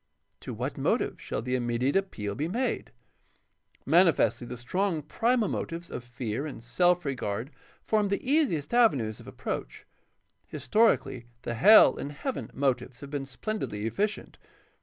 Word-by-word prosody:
To - - -7
what - - -4
motive - - 0
shall - - -4
the 125 +1 -3
immediate 125 +2 0
appeal 120 - -1
be 150 +8 -2
made? 240 +7 -2 0.9
Manifestly 165 -6 +3
the 125 - -6
strong 165 +6 -1
primal 230 - +1
motives 170 0 -4
of - - -5
fear 120 +2 -4
and 125 -6 -8
self 175 +8 +2
regard 120 -1 -3 0.3
form 215 -2 +1
the 200 +5 -2
easiest 265 - +1
avenues 135 - +3
of - - -13
approach. - - -5 0.6
His 145 -3 -8
torically 170 - +2 0.2
the 120 - -3
hell 205 - +7
and 145 - -5
heaven 260 - -4
motives 130 -2 -1
have 140 -1 -9
been 140 -2 -3
splendidly 125 - -4
efficient. 205 - -2
145 Hz, 145 wpm, -28 LUFS, 120-200 Hz, 0.9 s, hell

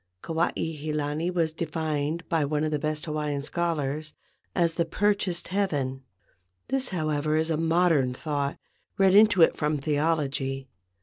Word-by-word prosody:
Kuai 165 +1 0
he 155 -1 -3
lani 150 +3 -1
was 165 -3 0
defined 160 0 -2
by 165 -4 +1
one 150 +1 0
of 155 - 0
the 150 - 0
best 155 0 -2
Hawaiian 150 -2 -2
schol¬ 170 +3 -1
ars 150 +2 -3 0.4
as 170 -2 +2
"the 170 - +1
purchased 190 0 0
heaven." 145 -10 -1 0.7
This, 270 -1 0
however, 155 -3 0
is 160 +1 +1
a - - +2
modern 165 -5 +2
thought, 145 -1 -2 0.4
read 195 -1 +5
into 205 -4 +7
it - - +4
from 150 0 0
theology. 140 -3 -1
155 Hz, 150 wpm, -27 LUFS, 145-170 Hz, 0.7 s, into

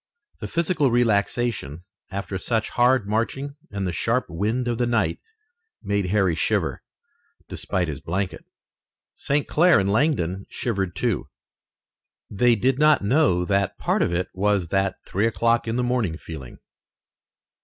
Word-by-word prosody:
The - - -5
physical 170 -4 +1
relaxation 110 - 0 0.3
after 95 0 -4
such 115 +2 -1
hard 125 -3 +3
marching 135 +6 -2
and 100 -1 -3
the 90 - -1
sharp 115 +9 0
wind 110 +9 -1
of 120 -1 -1
the 120 - +1
night 115 -2 0 0.6
made 100 -2 0
Harry 95 -2 +2
shiver, - - 0 0.7
despite 90 -2 -2
his 70 -3 -5
blanket. 95 +2 -3 0.7
St. 140 +1 -1
Clair 175 - +5
and 100 0 +1
Langdon 100 - 0
shivered, 95 -7 -2
too. 115 0 -1 1.0
They 120 +4 +3
did 130 +5 +1
not 150 -6 +5
know 100 - +3
that 100 0 0
part - - 0
of - - +1
it 90 +1 -1
was 100 -3 0
that 95 0 +1
three 100 +4 0
o'clock 115 0 +1
in 115 - -1
the 125 - 0
morning 120 -10 0
feeling. 75 -8 -9
105 Hz, 145 wpm, -24 LUFS, 95-125 Hz, 1.0 s, Clair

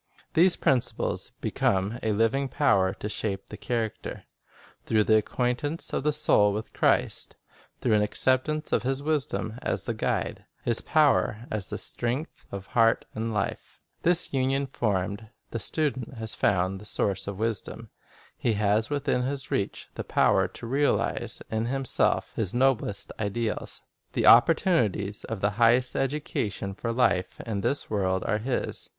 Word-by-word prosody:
These 175 +2 +5
principles 130 -3 0
become 100 +5 0
a 110 - 0
living 115 +6 +1
power 100 -11 +3
to - - -5
shape 100 -2 -3
the - - -5
character, 115 -3 -3 0.6
through 110 -1 +2
the 110 - +4
acquaintance 125 +8 -1
of - - 0
the 150 - +3
soul 105 -8 +3
with 110 +2 -5
Christ; - - +1 0.5
through 120 - +2
an 105 - +4
acceptance 130 +8 +1
of - - +2
His 135 +2 -2
wisdom 145 -6 -1
as - - -2
the - - -2
guide, - - -2 0.2
His 115 -1 +2
power 140 -7 +2
as 105 -3 -1
the - - -3
strength, 125 +7 -3
of 100 -1 -6
heart 115 +1 +3
and 115 +1 -3
life. 105 -2 -3 0.2
This 175 -2 +2
union 135 +1 +1
formed, 105 -3 -2 0.2
the 115 - -3
student 135 -2 -2
has 110 -1 -4
found 95 0 +1
the - - -11
Source 95 -2 -1
of 100 -1 -4
wisdom. 115 +1 -3 0.4
He 115 - 0
has 105 +1 +1
within 140 -3 0
his 135 +1 -3
reach 100 - -2
the - - -5
power - - +3
to - - -10
realize 140 +5 0
in 110 +1 0
himself 135 0 0
his 105 -1 -2
noblest 125 -6 +1
ideals. 110 +1 -3 0.3
The - - 0
oppor 125 +8 +8
tunities 105 - 0
of 110 -4 -5
the 100 - +2
highest 120 +2 +4
education 130 -8 -2
for 115 +4 -3
life 105 -7 +1
in 105 -4 -3
this 140 +7 -1
world 95 -3 0
are 105 - 0
his. 125 +3 -3
115 Hz, 155 wpm, -27 LUFS, 105-135 Hz, 0.6 s, oppor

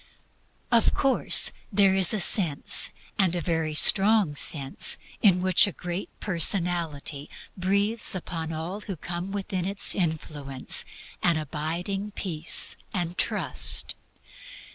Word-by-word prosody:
Of 235 -1 +3
course 270 -1 +3 0.2
there 195 -1 +4
is 190 -2 +2
a 215 - 0
sense, 170 -6 +3 0.3
and 185 -3 +2
a - - -1
very 160 -3 -2 0.2
wonderful 200 -5 +2
sense, 140 -1 +2 0.2
in 185 -4 +3
which 185 +1 +4
a - - -4
Great 175 +2 -6
Personality 170 -5 -2 0.3
breathes 200 +4 +2
upon 165 -3 -5
all 165 +6 -6
who 200 -2 -6
come 175 +4 -7
within 190 -2 -4
its 200 0 +1
influence 150 -6 -2 0.4
an 170 -2 +2
abiding 170 +7 -4
peace 170 -5 +1
and 175 -2 -3
trust. - - -3
180 Hz, 120 wpm, -25 LUFS, 160-195 Hz, 0.4 s, there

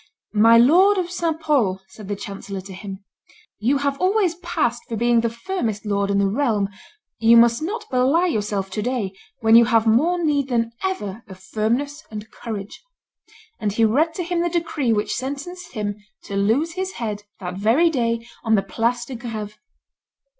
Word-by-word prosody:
"My 225 +2 +6
lord 360 - +6
of 355 -1 -2
St. 335 -3 -1
Pol," 250 -13 +1
said 195 +1 -11
the 205 - -2
chancellor 200 -1 -7
to 190 +1 -10
him, 195 +1 -8 0.6
"you 250 +7 +2
have 280 0 -2
always 375 -2 +2
passed 245 -9 -1
for 230 - -2
being 235 +1 +3
the 230 - 0
firmest 230 - -3
lord 200 -1 0
in 200 - +1
the 200 - +3
realm; 210 -2 +1 0.5
you 230 +1 +6
must 235 +2 +5
not 425 +7 -3
belie 265 +7 +3
yourself 205 - -1
to 210 - -2
day, 225 -5 -2 0.3
when 225 0 +5
you 235 0 +8
have 230 -1 +3
more 285 +11 +3
need 285 -3 +1
than 230 -2 0
ever 230 - -3
of 190 - -11
firmness 240 +10 -2
and 215 0 -8
courage;" 210 -3 -7 0.8
and 205 -2 -1
he 225 +1 +3
read 310 +9 +2
to 360 - -2
him 345 0 -1
the 345 - +1
decree 325 -7 -1
which 210 -1 0
sentenced 285 +8 -5
him 205 -3 -3 0.3
to 200 - -6
lose 225 +12 +2
his 375 +2 -4
head 215 -3 -4 0.2
that 180 -2 -5
very 255 +12 +4
day 230 -4 -1 0.2
on 225 -2 +3
the 195 - +2
Place 235 +5 -1
de 265 - -8
Greve. 220 -3 -6
235 Hz, 180 wpm, -22 LUFS, 210-300 Hz, 0.8 s, you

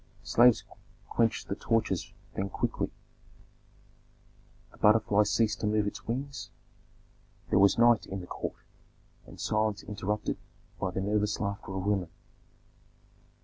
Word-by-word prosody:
Slaves 120 0 +5 0.5
quenched 115 -1 +1
the - - -2
torches 110 -4 0 0.2
then 95 +1 -2
quickly, - - -1 1.8
the - - -18
butterfly 105 -1 +5
ceased 105 +1 +1
to 105 - -1
move 105 0 +2
its 105 0 -5
wings, 135 +4 -4 1.0
there - - +5
was 100 0 +5
night 120 -1 +5
in 95 - -4
the 90 - -7
court, - - -5 0.7
and - - -13
silence 105 -1 0
interrupted 105 0 -3 0.4
by 95 - 0
the 95 +1 -3
nervous 105 +1 0
laughter 100 -1 -4
of 95 0 -3
women. 100 -4 0
105 Hz, 125 wpm, -30 LUFS, 100-110 Hz, 1.8 s, Slaves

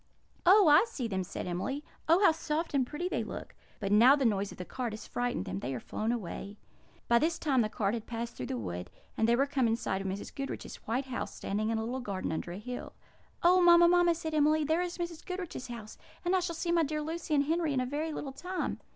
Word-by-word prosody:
"Oh, 390 0 +8
I 300 +8 +7
see 260 - -3
them!" 190 -3 -1
said - - -6
Emily. 190 +12 -3 0.3
"Oh, 360 +5 +6
how - - +8
soft 320 0 -2
and 265 -3 +2
pretty 325 +6 -3
they - - -1
look! - - -7 0.3
But 195 -2 -2
now 235 +7 +7
the 280 -3 0
noise 200 -3 +1
of - - -11
the 180 - -6
cart 245 0 -4
has 215 - -7
frightened 245 - -2
them; 95 +2 -4
they 130 +5 -3
are - - -3
flown 215 - -2
away." 205 -2 -5 0.5
By 235 0 +5
this 325 +3 +1
time 270 -5 +2
the 215 - 0
cart 205 -1 0
had 230 -2 -4
passed 235 0 -4
through 125 - -5
the 130 - -3
wood, 90 -4 -5 0.3
and 225 - +2
they 235 - +5
were 270 +3 +3
come 265 -3 +1
in 225 - +2
sight 195 -4 -2
of 195 - -4
Mrs. 195 +2 -5
Goodriche's 275 -1 -5
white 250 +5 0
house 255 -1 -4
standing 215 +2 -2
in 225 - 0
a 220 - -1
little 250 +3 -3
garden 200 -9 -3
under 160 +2 -3
a 175 - -6
hill. 245 +4 -6 0.5
"Oh, 360 +2 +6
mamma, 345 0 +8
mamma!" 350 -1 +4
said 320 -1 -5
Emily, 305 +1 +3
"there 320 +4 +1
is 355 -1 -3
Mrs. 340 -2 -5
Goodriche's 360 -8 -5
house! 230 -3 -8 0.3
And 355 +2 +3
I - - +4
shall 350 -2 -3
see 340 +1 -1
my 340 -1 +4
dear 305 0 -1
Lucy 320 0 -2
and 280 - +4
Henry 320 +1 0
in 270 - +1
a 255 - 0
very 300 +5 -2
little 280 -2 -5
time." 365 +5 -3
265 Hz, 255 wpm, -31 LUFS, 215-325 Hz, 0.5 s, Oh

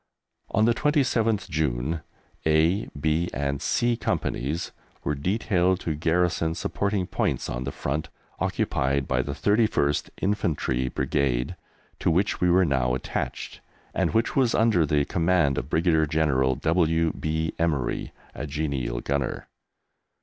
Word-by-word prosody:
On 110 +2 +3
the 120 - +4
27th 115 - +1
June 75 -1 -1 0.5
A, 80 +6 +3
B, 80 +3 +1
and 70 0 -2
C 120 0 +1
Companies 75 - -2 0.3
were - - 0
detailed 90 +3 +1
to 80 - -1
garrison 80 +1 +1
supporting 100 0 -1
points - - -1
on - - -4
the 70 - -3
front 70 +3 -3 0.3
occupied 65 0 0
by 65 -1 +1
the 70 +2 -4
31st 100 -5 +1
Infantry 75 -10 0
Brigade, 65 +3 0 0.4
to - - +1
which 95 +6 +1
we 90 - +4
were 90 +1 +5
now 65 -4 +1
attached, 65 - -4 0.3
and - - +1
which 115 +1 +1
was 130 -4 +3
under 110 -9 +3
the 70 0 +2
command 80 -5 +2
of 65 - -7
Brigadier 80 -1 +2
General 70 -4 +2
W. 80 +2 +2
B. 80 +1 -2
Emery, 75 -7 -1 0.2
a 75 - -5
genial 70 -5 -2
gunner. 70 -1 -2
80 Hz, 135 wpm, -26 LUFS, 70-90 Hz, 0.5 s, were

